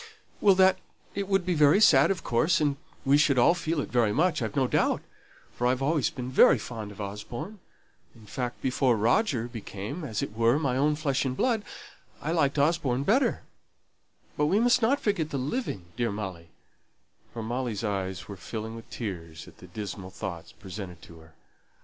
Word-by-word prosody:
"Well, 195 -2 +5 0.5
it 200 -1 -3
would 195 -2 +1
be 180 - +1
very 150 +3 +5
sad, 140 -10 +6
of 190 -4 -1
course, 125 +8 +2
and 145 -2 +1 0.3
we 140 +2 +5
should 145 -3 +3
all 120 +7 +6
feel 165 -2 -2
it - - -6
very 120 -4 +3
much, 160 - +1
I've 110 -3 -3
no 135 - +3
doubt; - - +1 0.5
for 120 - 0
I've 130 +1 +1
always 150 -1 +2
been 125 -1 -6
very - - +6
fond 110 -4 -7
of 105 - -14
Osborne; 105 - -6 0.6
in 110 -2 -16
fact, 125 +3 -5
before 130 -2 +2
Roger 120 - +1
became, 115 - -7
as 110 -8 -3
it 105 - -6
were, 115 +3 +3
my 140 -5 0
own 150 +3 +2
flesh 140 -3 0
and 130 -1 -2
blood, 230 -4 +1 0.6
I 155 - -3
liked 150 -4 +1
Osborne 140 -4 +1
better: 235 - +2 0.9
but 150 - +1
we 195 +6 +3
must 245 +2 +4
not 260 +6 +3
forget 185 -8 0
the 140 - -3
living, 130 - -3
dear 120 -1 0
Molly," 95 -5 -6 0.8
(for 115 - -6
Molly's 120 -2 -3
eyes 95 -3 -3
were 100 - -7
filling 110 +4 -6
with 115 - -11
tears 85 -8 -6
at 85 -2 -16
the 90 - -12
dismal 95 0 -6
thoughts 90 -3 -7
presented 95 -3 -9
to 85 -1 -13
her). 80 0 -18
125 Hz, 185 wpm, -27 LUFS, 105-155 Hz, 0.9 s, sad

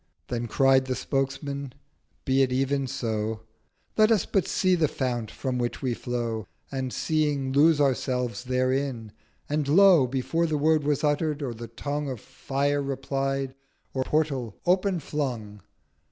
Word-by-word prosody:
Then 120 -1 -2
cried 130 +3 +4
the 130 -1 -2
Spokesman, 135 0 -2 0.5
'Be 135 0 +3
it 130 -1 +2
even 135 +1 0
so: 110 -4 -2 0.5
Let 215 +1 +5
us 215 -6 +3
but 195 - 0
see 185 -1 +2
the 165 -4 +3
Fount 120 -5 -2
from 130 -2 -3
which 120 +2 -3
we 125 -2 +1
flow, 115 -4 -3 0.2
'And, 130 -1 -3
seeing, 150 -4 0
lose 150 +3 +5
Ourselves 125 -3 0
therein!' 130 -2 -1 0.4
and, 150 -1 -1
Lo! 175 -3 +6
Before 140 +6 0
the 155 -1 0
Word 155 +1 +3
was 145 -1 +1
utter'd, 150 0 +1
or 125 -4 -3
the 115 +1 -8
Tongue 145 +5 -3
Of 130 -4 -5
Fire 140 +6 -1
replied, 135 0 -2 0.4
or 130 - 0
Portal 135 -8 -1
open 185 +1 +2
flung. 120 -9 -4
135 Hz, 150 wpm, -26 LUFS, 125-150 Hz, 0.5 s, Lo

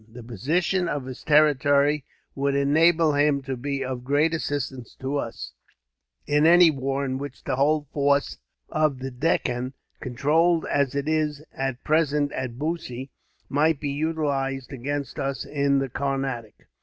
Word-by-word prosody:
The 120 +1 -10
position 160 - 0
of 145 -4 -3
his 130 -1 -8
territory 145 -1 +3 0.3
would 140 0 0
enable 160 +3 +4
him 145 -1 +2
to 130 0 -3
be 135 +1 -3
of 125 -1 -4
great 145 +5 +2
assistance 140 -6 -3
to 135 +2 -3
us, 115 -5 -5 0.7
in 150 +2 +3
any 175 -1 +7
war 135 0 -2
in 130 0 -2
which 140 -2 -8
the - - -1
whole 145 +2 +2
force 140 -1 +1 0.3
of 155 -3 +1
the 130 +1 -5
Deccan, 125 -2 -1 0.3
controlled 155 +7 +2
as 140 -2 0
it 140 +1 -2
is 155 -2 0
at 135 -2 -3
present 150 -2 +2
at 125 -2 -4
Bussy, 140 -4 -4 0.4
might 150 +1 +2
be 145 -2 -2
utilized 140 -3 -2
against 140 +1 -4
us 135 0 -2
in 140 -1 +1
the 135 0 0
Carnatic. 135 -4 -4
140 Hz, 150 wpm, -25 LUFS, 135-150 Hz, 0.7 s, any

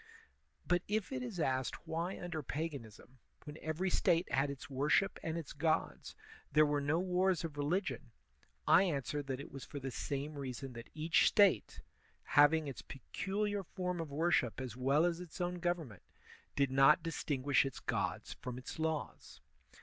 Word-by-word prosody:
But 175 -1 +3
if 210 +2 -1
it 260 -1 -2
is 235 -8 -5
asked 130 -2 -1
why 170 +3 -2
under 175 -3 -4
paganism, 130 -5 -6 0.2
when 150 +1 -9
every 160 +4 -1
State 170 0 +2
had 135 +1 +2
its 140 -1 -7
worship 145 +8 +1
and 160 +1 -3
its 160 -5 -6
gods, 155 +2 -1 0.4
there 155 0 +6
were 145 -1 +1
no 145 +3 +1
wars 185 0 +1
of 160 -3 -5
religion, 150 +7 -1 0.6
I - - +7
answer 150 -5 -1
that 135 -2 -4
it 140 - -8
was 135 - -8
for 145 - -7
the 135 -1 -4
same 145 +3 -4
reason 130 -1 -5
that 115 -1 -9
each 160 +1 +3
State, 195 - +3 0.4
having 145 +1 +5
its 135 - -6
peculiar 200 - -3
form 180 -1 -4
of 160 - -5
worship 145 -5 +1
as 125 -3 -5
well 135 +5 +3
as 175 -1 0
its 180 0 -9
own 180 0 -1
government, 170 - -2 0.5
did 140 -2 +2
not 135 +5 +6
distinguish 145 -4 +1
its 135 -2 -5
gods - - -2
from 125 -1 -5
its 130 +5 -8
laws. 160 -1 -3
155 Hz, 165 wpm, -35 LUFS, 135-175 Hz, 0.6 s, I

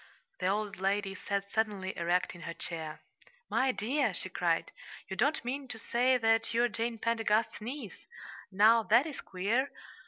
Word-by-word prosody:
The - - 0
old 205 +1 -1
lady 195 +1 0
sat 200 0 -3
suddenly 205 -4 -1
erect 175 +1 0
in 175 - -12
her 170 +1 -6
chair. 160 -3 -5 0.5
"My 265 0 +3
dear," 260 +6 0
she - - -1
cried, - - 0 0.4
"you - - -5
don't 290 -4 +1
mean 270 +2 -3
to 245 -3 -6
say 250 +3 +2
that 225 0 +2
you're 240 +1 +3
Jane 230 +1 -2
Pendergast's 225 -1 +1
niece! 245 -1 -7 0.4
Now, 215 +4 +6
that 235 +5 +4
is 310 -3 -6
queer! 215 +9 0
220 Hz, 160 wpm, -31 LUFS, 195-240 Hz, 0.5 s, Now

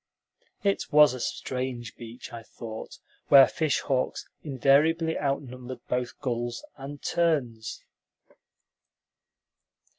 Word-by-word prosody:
It 200 -1 0
was 150 -3 +7
a 130 - -6
strange 125 -1 -4
beach, 120 +1 -10
I 115 - -6
thought, 110 0 -8 0.3
where 135 -1 +9
fish 155 -4 0
hawks 130 -3 -1
invariably 155 +4 +3
outnumbered 130 -3 -3
both 125 -1 -2
gulls 120 -3 -2
and 140 +1 -8
terns. 130 -10 0
130 Hz, 95 wpm, -27 LUFS, 120-145 Hz, 0.3 s, where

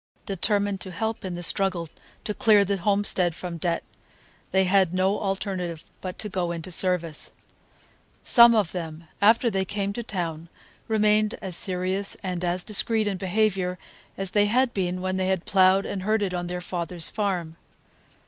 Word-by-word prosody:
Determined 200 0 0
to 190 - -5
help 220 +5 -3
in 185 -2 -4
the 175 - -5
struggle 185 -2 0 0.4
to 210 - -2
clear 205 -1 +4
the 200 +1 0
homestead 195 -3 +1
from 175 -1 -6
debt, 170 0 -1 0.7
they 190 0 +3
had 185 -1 +3
no 190 +2 +2
alternative 190 -4 -3 0.2
but 185 -1 -6
to 215 - -3
go 185 -4 -2
into 170 +1 -5
service. 170 -3 0 0.9
Some 235 -1 +7
of 205 -6 +2
them, 165 -2 -6 0.2
after 225 +3 +5
they 190 -1 0
came 200 +1 -3
to 235 - -4
town, 170 -6 -4 0.4
remained 215 -1 +2
as 190 -4 -4
serious 185 +2 0
and 180 -2 -3
as 175 +1 -1
discreet 220 +1 +1
in 200 -2 -1
behavior 190 -1 0 0.4
as 195 -1 -2
they 205 0 +3
had 250 +3 +2
been 180 -2 -2
when 185 0 -1
they 190 0 +1
ploughed 190 +2 +3
and 195 - -4
herded 205 -1 0
on 175 -1 -3
their 180 0 -4
father's 175 -1 -2
farm. 185 -6 -2
190 Hz, 165 wpm, -25 LUFS, 180-205 Hz, 0.9 s, Some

